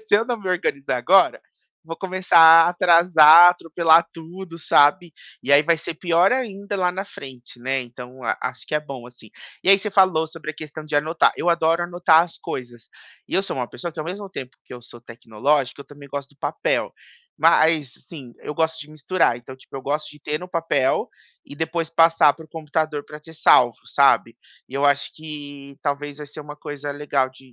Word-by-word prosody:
se 220 -1 0
eu 225 - 0
não 245 -2 -3
me 195 - -11
organizar 140 -7 -2
agora, 185 +9 +3 0.4
vou 165 0 -8
começar 185 -2 +1
a 165 0 +8
atrasar, 170 -1 +6
atropelar 165 -1 +2
tudo, 170 +1 -11
sabe? 160 +3 +3 0.3
E 140 - -5
aí 145 +1 +6
vai 165 +1 +1
ser 165 - -6
pior 175 +2 +2
ainda 200 -6 -4
lá 180 -1 0
na 190 - -4
frente, 130 -10 -13
né, 130 +2 -2
então 125 +1 -12
a 115 - -2
acho 125 0 -6
que - - -5
é 150 - +1
bom 135 -5 -10
assim. 120 -3 -16 0.3
E - - 0
aí 195 - +6
você 210 +2 -5
falou 185 -5 +2
sobre 160 -1 -8
a - - -12
questão 155 0 -9
de 155 -1 -7
anotar, 160 +3 +2
eu 175 - -2
adoro 165 0 +1
anotar 175 -2 +3
as 170 -1 -7
coisas 120 -3 -8 0.4
e - - -6
eu 195 - +2
sou 195 - -5
uma 125 -2 -3
pessoa 175 - -7
que - - -15
ao 155 - -4
mesmo 195 +4 -7
tempo 130 -9 -9
que - - -15
eu 120 - -12
sou 120 0 -13
tecnológica 120 +4 -2
eu 140 - -10
também 145 0 -15
gosto 140 -1 -6
do - - -40
papel. - - -2 0.5
Mas 155 -4 +3 0.2
sim, 135 -8 -11
eu 150 - -6
gosto 160 +1 -2
de 150 0 -11
misturar. 155 -2 0
Então 120 +2 -12
tipo 130 - -20
eu - - -6
gosto 150 +3 -4
de 150 - -16
ter 150 +1 -4
no 180 - -9
papel 165 -6 -1 0.4
e - - -11
depois 160 +1 -3
passar 165 -2 +4
para 160 - -14
o - - -21
computador 155 -2 -3
para 150 0 -12
ter 160 +2 -15
salvo, 125 -6 +3
sabe. - - +2 0.3
E - - -13
eu 140 +1 -1
acho 140 0 +1
que, 145 -3 -10
talvez, 145 0 -4
vai 150 - -9
ser 150 +2 -10
uma 150 0 -10
coisa 145 -1 -7
legal 140 -2 -2
de 130 -1 -20
155 Hz, 210 wpm, -21 LUFS, 140-170 Hz, 0.5 s, a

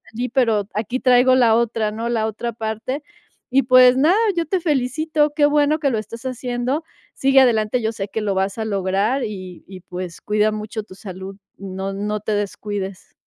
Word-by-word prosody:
allí, 245 +2 -2
pero 225 -6 +1
aquí 235 +4 -2
traigo 255 0 +5
la 235 -3 +5
otra", 225 -2 0
¿no? 230 +2 -4
la 220 -2 0
otra 220 +2 -4
parte. 220 +5 -4 0.5
Y, 270 - +7
pues 255 0 +6
nada, 330 +9 +4 0.2
yo 335 -2 -1
te 375 +2 0
felicito, 300 +1 0
qué 295 -2 +4
bueno 295 +1 +3
que 280 -3 +1
lo 220 - 0
estás 230 +3 -9
haciendo. 255 +3 -2 0.3
Sigue 270 0 +4
adelante, 230 -2 +2
yo 220 - 0
sé 205 -3 -5
que 220 - -3
lo 205 -2 0
vas 195 +2 -1
a 220 - -2
lograr, 200 +5 0
y 185 -4 -7
y, 185 -1 -10
pues 180 -1 -7
cuida 210 +1 +1
mucho 215 +1 -5
tu 185 - -14
salud. 190 0 -8 0.2
No 195 0 -5
no 210 +1 -2
te 215 - -4
descuides. 205 -1 -4
220 Hz, 190 wpm, -21 LUFS, 205-255 Hz, 0.5 s, Y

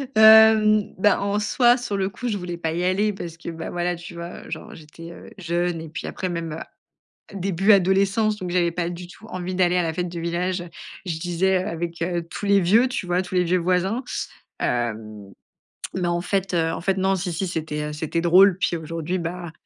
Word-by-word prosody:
Hem, 220 -1 +7
bah 200 +1 +3
en 200 +1 0
soi, 240 +3 +3
sur 240 -5 -4
le 195 0 0
coup, 245 +6 -6
je 210 -3 -1
voulais 175 -2 -5
pas 160 -1 -2
y 175 - -2
aller 200 +3 +1
parce 170 -3 -7
que, 170 - -7
bah, 165 0 -6
voilà, 175 0 -1
tu 170 0 -10
vois, 170 +1 -8
heu, - - -12
genre - - -7
j'étais, 165 +2 -12
heu, - - -12
jeune 175 -1 -1
et 160 - -8
puis, 155 - -6
après, 185 - -4
même, 170 -2 -4
heu, 160 - -11 0.5
début 195 +2 +3
adolescence, 195 +3 +3
donc, 185 -3 -5
j'avais 175 -1 +2
pas 170 0 -2
du 175 0 -7
tout 195 +5 -14
envie 185 -2 -4
d'aller 180 -1 +2
à - - +2
la 160 -1 -2
fête 180 +1 -2
du 170 -1 -6
village. 175 +2 -1 0.4
Je 165 -2 -2
disais: 180 +2 +1
«Heu, - - -6
avec, 170 -1 -4
heu, 175 0 -1
tous 205 - -6
les 200 0 +5
vieux, 215 +8 +4
tu 220 -7 -4
vois, 180 +1 +1
tous 185 0 -8
les 180 0 +3
vieux 180 +2 +2
voisins». 185 +7 0 0.6
Hem, 110 -4 -3 0.6
mais, 180 -2 -1
en 175 0 0
fait, 195 +1 -1
heu, 165 -1 +1
en - - -4
fait, 190 +2 0
non, 190 +1 +2
si, 180 -2 -3
si. 185 +3 -2
C'était, 155 -3 -3
heu, - - -6
c'était 160 +2 -2
drôle. 180 +2 +6
Puis, 175 -2 0
aujourd'hui, 165 +2 -3
bah, 170 0 -5
180 Hz, 225 wpm, -23 LUFS, 170-195 Hz, 0.6 s, Hem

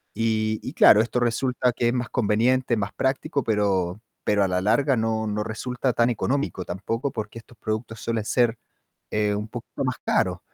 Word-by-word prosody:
Y 110 -1 0
y 130 - -5
claro, 105 - +7
esto 120 +2 -1
resulta 125 +1 +1
que 120 0 +1
es - - 0
más 125 -2 -2
conveniente, 120 +3 +2
más 100 -1 -3
práctico, 140 +2 -1
pero 100 -3 0 0.2
pero 105 -1 +2
a - - +2
la 90 0 +1
larga 125 +7 +2
no 110 0 0
no 105 0 -1
resulta 125 +3 -2
tan 120 +1 +3
económico 125 -4 -1
tampoco, 115 +9 -3
porque 110 0 -6
estos 115 +1 -18
productos 110 +1 -4
suelen 115 -2 -2
ser, 120 0 +2 0.5
eh, 105 -1 +1
un 105 +1 -3
poquito - - -6
más - - -1
caros. - - +1
115 Hz, 180 wpm, -24 LUFS, 105-125 Hz, 0.5 s, claro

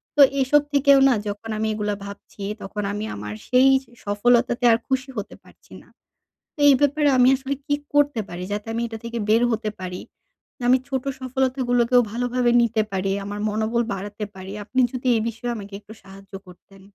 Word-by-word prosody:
তো 290 - +5 0.2
এসব 285 +3 +4
থেকেও 280 -1 +5
না - - +4
যখন 205 +2 -6
আমি 220 0 -1
এগুলো 210 -1 -2
ভাবছি 200 0 -10 0.2
তখন 210 +1 -5
আমি 210 +1 -4
আমার 105 +1 -6
সেই 255 +1 +5
যে 240 - -25
সফলতাতে 240 +4 +2
আর 225 - +4
খুশি 265 0 -1
হতে 205 - -5
পারছি - - -22
না। - - -22 0.7
তো - - -18
এই 275 - +7
ব্যাপারে 290 +1 +3
আমি 250 0 +5
আসলে 270 +1 -4
কি 290 - +1 0.2
করতে 290 -4 +2
পারি 175 +1 -6
যাতে 210 +2 -4
আমি 230 - -2
এটা 225 - -7
থেকে 235 0 -5
বের 225 +2 +4
হতে 220 -1 -1
পারি? 180 0 -5 0.6
যে - - -10
আমি 255 - +6
ছোট 265 -2 -2 0.2
সফলতা 260 0 -1
গুলোকেও 245 0 +4
ভালোভাবে 245 +1 0
নিতে 225 -1 +1
পারি, 195 0 -1
আমার 205 +1 -5
মনোবল 220 +3 0
বাড়াতে 205 +2 -5
পারি। 190 0 -9
আপনি 255 +5 -2
যদি 255 0 -4
এই 220 - +1
বিষয়ে 235 +2 -4
আমাকে 200 -1 -9
একটু 215 +1 -14
সাহায্য 195 +1 -15
করতেন। 190 +2 -17
230 Hz, 190 wpm, -23 LUFS, 205-255 Hz, 0.7 s, এই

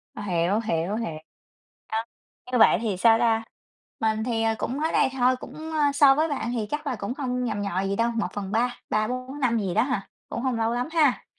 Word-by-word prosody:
Hiểu, 190 0 0
hiểu, 190 -2 -1
hiểu. 195 -9 -3 0.7
À, 220 +1 -2 0.5
như 250 - +2
vậy 220 - +7
thì 210 -5 -1
sao 225 +3 +5
ta? 225 -1 +2 0.6
Mình 220 -1 +1
thì, 230 -2 0
ờ, 225 0 +2
cũng 265 +4 -2
mới 320 +1 0
đây - - +3
thôi, 255 +1 +4
cũng, - - -10 0.2
ơ, 295 -2 +2
so 280 -1 +7
với 310 +3 +1
bạn 265 -5 -2
thì 225 -3 -2
chắc 295 0 -3
là 260 -4 -1
cũng 205 +4 -4
không 250 -3 -2
nhằm 215 -4 -2
nhò 190 -2 -1
gì 195 +1 -1
đâu, 235 +1 +2
1/3 225 +2 -1
3-4 255 +6 -2
năm 235 -3 +2
gì 190 -5 -2
đó 220 - +4
hà, 250 -7 -2 0.2
cũng 235 - -4
hông 255 -3 0
lâu 225 0 +1
lắm 245 +5 -1
ha? 300 -6 +3
230 Hz, 215 wpm, -25 LUFS, 215-255 Hz, 0.7 s, vậy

